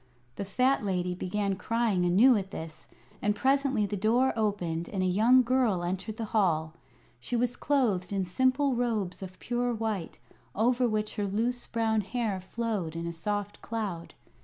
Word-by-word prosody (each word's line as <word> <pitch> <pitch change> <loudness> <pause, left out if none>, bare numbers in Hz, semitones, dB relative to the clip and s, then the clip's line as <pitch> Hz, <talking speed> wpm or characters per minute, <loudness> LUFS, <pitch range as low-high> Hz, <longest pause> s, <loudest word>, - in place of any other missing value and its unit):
The 200 - -4
fat 255 +6 +2
lady 180 -2 -1
began 195 +2 -1
crying 225 -6 0
anew 220 +9 +6
at 195 -2 -2
this, 160 -3 -8 0.3
and 210 0 +1
presently 265 -2 +2
the 205 - -3
door 230 +6 +2
opened 180 -7 -1
and 190 -2 -1
a - - +1
young 225 +8 +5
girl 235 -7 +1
entered 190 +5 -3
the 225 - -3
hall. 160 -7 +2 0.5
She 180 - -4
was 245 +1 +1
clothed 220 -11 0
in 195 -2 0
simple 260 +8 +2
robes 225 -7 -1
of 185 -1 -8
pure 245 0 -1
white, 215 -6 -3 0.4
over 245 +3 +2
which 215 0 -2
her 205 -1 0
loose 235 +5 -1
brown 220 -2 +1
hair 210 -2 -2
flowed 200 -5 -3
in 165 0 -4
a 170 - -3
soft 205 +4 -3
cloud. 205 -7 -4
210 Hz, 165 wpm, -29 LUFS, 185-240 Hz, 0.5 s, anew